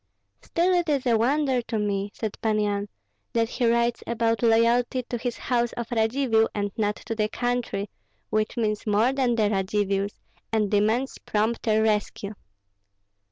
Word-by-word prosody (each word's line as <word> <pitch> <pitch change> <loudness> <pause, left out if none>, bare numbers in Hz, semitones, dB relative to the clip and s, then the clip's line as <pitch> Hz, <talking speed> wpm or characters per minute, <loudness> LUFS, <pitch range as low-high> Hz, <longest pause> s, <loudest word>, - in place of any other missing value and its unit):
"Still 355 +2 +1
it 350 -2 +1
is 280 -3 +1
a 240 -2 +4
wonder 260 +2 +2
to 230 -1 -4
me," 200 -1 -1
said 220 -1 -4
Pan 215 -1 +1
Yan, 205 -1 -1 0.4
"that 230 -1 +1
he 245 -2 0
writes 235 0 +2
about 230 -1 0
loyalty 235 +2 +3
to 240 0 -4
the 245 +1 -1
house 240 -1 0
of 235 0 -5
Radzivill, 225 0 +2
and 205 -1 -1
not 210 -1 0
to - - -6
the 215 -1 0
country, 245 -4 -2 0.4
which 215 +1 0
means 215 -2 -1
more 215 +5 +3
than 255 -3 +1
the 215 -2 +2
Radzivills, 195 0 0 0.3
and 215 -3 +1
demands 220 +6 +1
prompter 220 0 +1
rescue." 210 -1 -1
225 Hz, 160 wpm, -25 LUFS, 210-240 Hz, 0.4 s, a